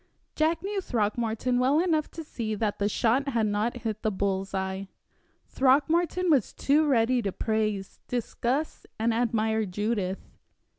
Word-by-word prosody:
Jack 320 +2 +1
knew 395 0 -2
Throckmorton 230 - 0
well 265 +4 +3
enough 325 -3 +1
to 325 - -7
see 220 -7 -4
that 210 -1 -2
the 205 0 +1
shot 245 +6 +1
had 230 -4 +1
not 215 +4 -1
hit 215 -2 -3
the 220 - +1
bull's 195 -1 -1
eye. 190 0 -3 0.6
Throckmorton 325 +7 +2
was 270 -8 +2
too 300 +2 +2
ready 250 -2 +3
to 200 -3 -2
praise, 215 -2 -2
discuss, 250 +4 -2
and 225 +1 +1
admire 220 -1 +1
Judith. 200 -1 -2
230 Hz, 145 wpm, -27 LUFS, 210-275 Hz, 0.6 s, well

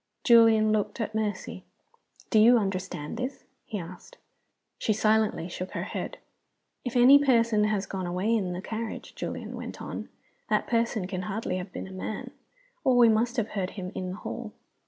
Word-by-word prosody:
Julian 225 -2 +6
looked 210 0 0
at 220 -1 -2
Mercy. 215 -3 -3 0.7
"Do 220 - +5
you 235 +3 +7
understand 185 -7 -3
this?" 255 +2 -4 0.2
he 215 - -3
asked. 180 - -10 0.6
She 215 - +1
silently 215 -5 +2
shook 185 +1 -6
her - - -2
head. - - -5 0.7
"If 245 -1 -4
any 270 +4 +8
person 230 -5 +3
has 210 -2 0
gone 190 -2 -4
away 185 +6 +1
in 190 -5 -1
the 180 +2 -5
carriage," 225 +1 -5
Julian - - -5
went - - -7
on, - - -6 0.4
"that - - +2
person 230 -4 0
can 185 0 -4
hardly 195 -1 -3
have 185 +1 -6
been - - -6
a - - -11
man, 190 +3 -5 0.5
or 260 -3 +4
we 240 -2 +7
must 230 +2 +1
have 225 -2 0
heard 195 -3 -3
him 185 -1 -5
in 185 -1 -4
the 185 - -4
hall." 220 0 -6
215 Hz, 180 wpm, -28 LUFS, 185-230 Hz, 0.7 s, any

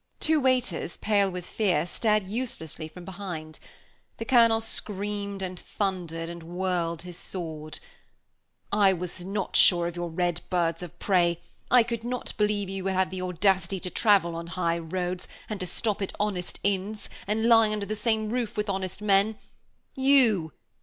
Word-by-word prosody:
Two 315 -1 +3
waiters, 250 - +1
pale 200 -2 +2
with 180 -1 -6
fear, 180 -8 +1
stared 215 +2 +1
uselessly 190 - -4
from 175 +2 -11
behind. 175 -5 -6 0.6
The 225 - -4
Colonel 230 -2 +5
screamed 205 -2 -3
and 185 -1 -5
thundered, 175 -5 -3
and 170 0 -7
whirled 170 -1 -2
his 180 -1 -8
sword. 160 -5 -6 0.9
"I 200 -2 +5
was 180 0 -5
not 195 +1 -3
sure 175 -2 +6
of 170 0 -3
your 175 0 -3
red 175 0 -1
birds 170 -2 +1
of 175 -3 -8
prey; 175 -3 +2 0.3
I 250 -1 +7
could 230 -1 -4
not 250 +1 -4
believe 210 -1 +1
you 195 0 -4
would 195 - +1
have 185 0 +1
the 185 -1 -4
audacity 185 +1 +1
to 180 - -4
travel 195 -6 +3
on 170 0 -5
high 170 -1 0
roads, 180 +2 -3 0.2
and 210 -2 -4
to 185 - -3
stop 210 +3 -2
at 195 - -2
honest 200 -4 -2
inns, 200 +2 -1 0.2
and 220 +2 +1
lie 225 -2 +6
under 210 -1 -2
the 215 - -3
same 220 -1 0
roof 235 -4 -2
with 210 -1 0
honest 190 0 -4
men. 205 +1 +3 0.6
You! 255 - +4
190 Hz, 165 wpm, -27 LUFS, 175-210 Hz, 0.9 s, I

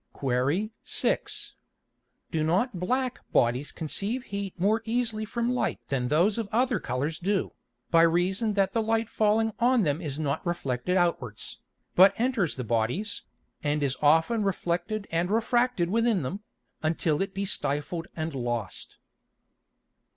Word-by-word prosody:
Qu. 140 - 0
6. - - 0 0.8
Do 160 -1 0
not 185 +6 +1
black 255 +7 -1
Bodies 125 +4 +2
conceive 200 - -2
heat 200 -4 -5
more 210 +5 +2
easily 225 -1 -1
from 235 +3 -1
Light 250 - 0
than 125 -3 0
those 175 - +3
of 220 -3 -3
other 240 -1 +2
Colours 145 +6 -2
do, 195 +2 0 0.4
by 165 - +6
reason 185 +6 +2
that 195 -1 +1
the 230 - +2
Light 225 0 0
falling 220 +1 +2
on 245 -1 +4
them 150 0 0
is 145 -4 -3
not 150 -1 -1
reflected 175 0 -1
outwards, 130 - -1 0.3
but 195 +4 +6
enters 235 - +1
the 125 - -4
Bodies, 120 - -1 0.4
and 145 0 0
is 135 -2 +1
often 160 +10 +4
reflected 195 +1 -1
and 170 +2 0
refracted 230 -4 +1
within 230 -5 +2
them, 180 +10 -3 0.4
until 155 0 0
it 195 0 -3
be 200 +1 -1
stifled 165 -1 -2
and 160 -1 -3
lost? 120 -3 -3
185 Hz, 145 wpm, -27 LUFS, 150-220 Hz, 0.8 s, by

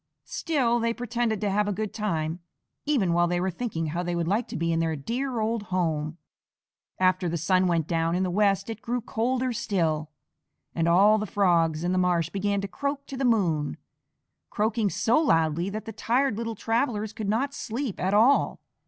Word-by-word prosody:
Still 255 -8 0
they 230 0 0
pretended 240 -2 -1
to 205 -2 0
have 210 +1 +1
a - - 0
good 210 +1 -3
time, 165 -6 -2 0.5
even 220 - +2
while 175 0 +3
they 175 0 0
were 185 +1 0
thinking 175 -4 -3
how 165 +3 -2
they 175 -1 -2
would 170 -1 -1
like 215 +6 0
to - - -5
be 165 0 0
in 165 - +1
their 165 -1 0
dear 240 - -3
old 220 +1 0
home. 165 -5 -2 0.8
After 185 -1 +2
the 170 - -1
sun 185 +3 +2
went 165 -3 +1
down 165 0 0
in 185 - +1
the 185 - -1
west 200 0 +2
it 225 -1 -6
grew 245 +1 -2
colder 250 +2 -1
still, 160 -8 -1 0.6
and 165 0 0
all 200 +5 +5
the 215 - -3
Frogs 170 -5 +2
in 175 - 0
the 185 - +2
marsh 175 -2 +1
began 200 0 0
to 200 - -3
croak 280 +6 -3
to 275 - -7
the 265 - -3
moon, 175 -11 +1 0.7
croaking 215 0 0
so 230 +7 +2
loudly 165 - +2
that 215 +2 -5
the 225 - -6
tired 245 +3 +1
little 230 0 -3
travellers 225 -1 -1
could 215 -2 -4
not 265 +7 0
sleep 245 -3 -4
at 190 +2 +1
all. 240 +7 +4
200 Hz, 195 wpm, -26 LUFS, 170-230 Hz, 0.8 s, all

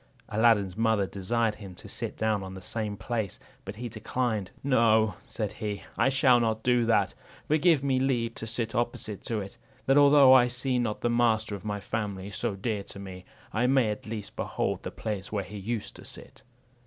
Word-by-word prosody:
Aladdin's 105 -4 +3
mother 110 -3 +2
desired 105 +4 0
him 100 -4 -10
to - - -11
sit - - -5
down 110 -2 +1
in 95 0 -7
the - - -7
same 105 -1 -3
place, 110 -5 -3 0.3
but 95 +2 -7
he 120 +3 -5
declined. 110 -2 -2
"No," 110 -5 +4
said 105 -3 -3
he, 105 -2 -5
"I 125 - +3
shall 130 -2 +5
not 110 -1 0
do 120 -2 +3
that; 105 -5 +3 0.3
but 155 0 +2
give 165 -6 +4
me 135 -2 +2
leave 120 -3 0
to 115 - -6
sit 115 0 -3
opposite 120 -3 -2
to 110 -3 -1
it, 100 0 -9 0.3
that 135 +2 +5
although 140 -2 +8
I 125 -2 +7
see 125 +1 0
not 115 -3 -2
the 120 - +1
master 115 -3 +2
of 100 +1 -5
a 105 0 -3
family 100 -2 -4
so 100 - -2
dear 105 +1 -2
to - - -9
me, 95 -2 -9 0.3
I 120 +3 +2
may 130 -4 +3
at 105 - -7
least 105 -2 -6
behold - - -2
the - - -5
place 105 -3 -5
where 100 -2 -1
he 105 +3 -9
used 110 +2 -4
to - - -12
sit." - - -10
110 Hz, 205 wpm, -28 LUFS, 105-120 Hz, 0.3 s, although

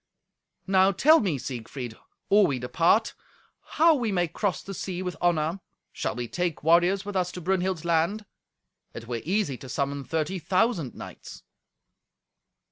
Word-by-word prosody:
"Now 190 0 +4
tell 310 - +5
me, 180 -9 0
Siegfried, 125 -1 -6 0.3
or 205 -1 +6
we 140 -5 -1
depart, 170 - +2 0.6
how 330 +1 +6
we 240 -7 -1
may 175 -2 +1
cross 190 +1 -2
the 195 - -7
sea 185 0 -4
with 180 -1 -4
honour? 170 0 +1 0.3
Shall - - -3
we 120 -1 -4
take 175 +2 -3
warriors 175 +5 +3
with 205 -1 -6
us 180 -1 0
to - - -6
Brunhild's 185 -1 -1
land? 170 +6 +1 0.7
It 115 - -8
were 120 -2 -3
easy 180 -7 0
to 130 - -11
summon 140 0 -2
thirty 160 +7 -2
thousand 185 - 0
knights." - - -10
175 Hz, 150 wpm, -26 LUFS, 150-195 Hz, 0.7 s, or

